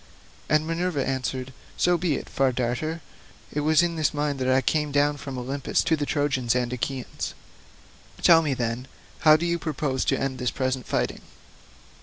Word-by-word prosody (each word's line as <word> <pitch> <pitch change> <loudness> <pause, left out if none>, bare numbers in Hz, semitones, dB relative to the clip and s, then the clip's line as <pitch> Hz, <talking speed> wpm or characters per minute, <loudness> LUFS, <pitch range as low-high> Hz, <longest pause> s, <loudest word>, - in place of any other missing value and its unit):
And 155 0 +3
Minerva 165 -3 -1
answered, 130 -1 -3 0.2
"So 180 - +3
be 170 -3 0
it, - - -5
Far 135 -1 +1
Darter; 130 +7 -2 0.5
it 150 - -1
was 155 +3 +4
in 170 -1 -1
this 155 -1 +1
mind 145 -2 -1
that 130 - -1
I 130 0 +5
came 150 +3 0
down 145 +1 +2
from 140 -2 -6
Olympus 135 +3 -1
to 160 - +2
the 145 -2 -3
Trojans 135 -5 +1
and 125 -1 0
Achaeans. 125 +1 -4 0.9
Tell 165 -2 +7
me, 145 -4 0
then, 120 +1 -2 0.3
how 155 -1 +7
do 170 - -2
you 170 0 0
propose 145 -4 -1
to - - +1
end 135 -2 -2
this 125 -1 0
present 130 -1 -2
fighting?" - - -1
140 Hz, 180 wpm, -25 LUFS, 130-155 Hz, 0.9 s, Tell